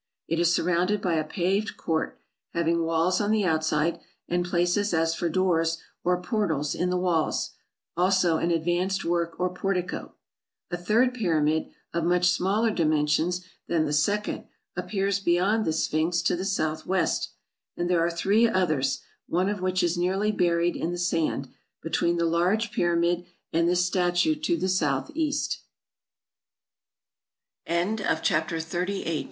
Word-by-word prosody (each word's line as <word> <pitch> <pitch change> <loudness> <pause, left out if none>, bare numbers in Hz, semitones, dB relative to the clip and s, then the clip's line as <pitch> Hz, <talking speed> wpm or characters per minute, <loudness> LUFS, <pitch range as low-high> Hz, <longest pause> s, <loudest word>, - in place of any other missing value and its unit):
It 165 - 0
is 170 0 +3
surrounded 180 +4 +1
by 180 -3 0
a 160 -1 +1
paved 190 +6 -1
court, 160 -1 -2 0.4
having 170 0 +1
walls 165 +3 +1
on 205 - 0
the 215 -2 +2
outside, 155 -1 +1 0.3
and 175 0 0
places 175 +2 +1
as 165 0 +2
for 170 +1 -1
doors 165 -2 +1 0.3
or 180 0 +2
portals 175 -6 -1
in 180 +1 -1
the 180 - +1
walls; 175 -3 0 0.4
also 180 -2 +3
an 170 - 0
advanced 175 +3 0
work 170 0 -1
or 180 0 0
portico. 185 -1 -3 0.6
A - - 0
third 225 +8 +2
pyramid, 160 -8 +1 0.2
of 170 -1 0
much 180 +1 +3
smaller 205 +5 +1
dimensions 160 +1 +1 0.2
than 165 -2 +1
the 150 - -2
second, 205 +8 0 0.3
appears 195 +2 -1
beyond 195 +4 +2
the - - +1
Sphinx 160 +2 0
to 170 - +2
the 185 +2 -4
south 155 -5 -1
west; 190 0 0 0.4
and 175 - -1
there 175 -2 +2
are 170 - +2
three 200 +7 +3
others, 155 -9 0 0.2
one 185 +3 +1
of 205 -2 -3
which 185 0 +1
is 175 0 +1
nearly 190 +4 +1
buried 175 -3 +1
in 165 - -2
the 175 - -3
sand, 165 -5 0 0.4
between 170 +1 +1
the 170 - +1
large 180 +7 +1
pyramid 175 -4 +1 0.3
and 170 +1 +3
175 Hz, 135 wpm, -26 LUFS, 165-185 Hz, 0.6 s, is